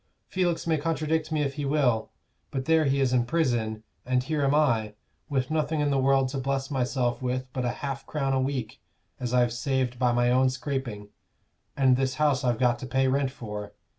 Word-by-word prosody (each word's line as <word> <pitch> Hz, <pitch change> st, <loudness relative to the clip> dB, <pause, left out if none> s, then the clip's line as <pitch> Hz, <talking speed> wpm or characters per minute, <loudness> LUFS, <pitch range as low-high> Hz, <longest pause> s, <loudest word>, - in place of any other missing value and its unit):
Felix 175 Hz, -3 st, -1 dB
may 160 Hz, -2 st, +1 dB
contradict 160 Hz, 0 st, -1 dB
me 155 Hz, -1 st, +1 dB
if 140 Hz, -1 st, -2 dB
he 145 Hz, -, -4 dB
will; 135 Hz, -6 st, +1 dB, 0.4 s
but 130 Hz, -1 st, -3 dB
there 160 Hz, 0 st, +4 dB
he 140 Hz, 0 st, +2 dB
is 130 Hz, -2 st, +2 dB
in 125 Hz, -1 st, +3 dB
prison, 120 Hz, -7 st, 0 dB, 0.2 s
and 125 Hz, 0 st, +1 dB
here 155 Hz, +1 st, -1 dB
am 140 Hz, +1 st, +3 dB
I, 115 Hz, -8 st, +2 dB, 0.3 s
with 135 Hz, -1 st, -1 dB
nothing 155 Hz, 0 st, 0 dB
in 145 Hz, -1 st, +1 dB
the 135 Hz, -, +2 dB
world 135 Hz, 0 st, +3 dB
to 135 Hz, +1 st, -3 dB
bless 135 Hz, +1 st, -2 dB
myself 125 Hz, -1 st, 0 dB
with 130 Hz, 0 st, -1 dB
but 130 Hz, -1 st, -2 dB
half 135 Hz, +2 st, -3 dB
a -, -, -30 dB
crown 135 Hz, -3 st, -1 dB
a 130 Hz, -, +2 dB
week 130 Hz, -5 st, -3 dB, 0.4 s
as 125 Hz, -2 st, -3 dB
I've 120 Hz, -1 st, +3 dB
saved 125 Hz, 0 st, -1 dB
by 125 Hz, -2 st, +3 dB
my 120 Hz, 0 st, +2 dB
own 130 Hz, +1 st, +4 dB
scraping, 130 Hz, -6 st, -4 dB, 0.7 s
and 130 Hz, -2 st, +4 dB
this 130 Hz, 0 st, 0 dB
house 145 Hz, -2 st, +2 dB
I've 120 Hz, -2 st, +1 dB
got 120 Hz, 0 st, +2 dB
to 130 Hz, -, -6 dB
pay 130 Hz, +1 st, +2 dB
rent 135 Hz, +1 st, +1 dB
for. 105 Hz, -6 st, -7 dB
130 Hz, 205 wpm, -27 LUFS, 125-145 Hz, 0.7 s, there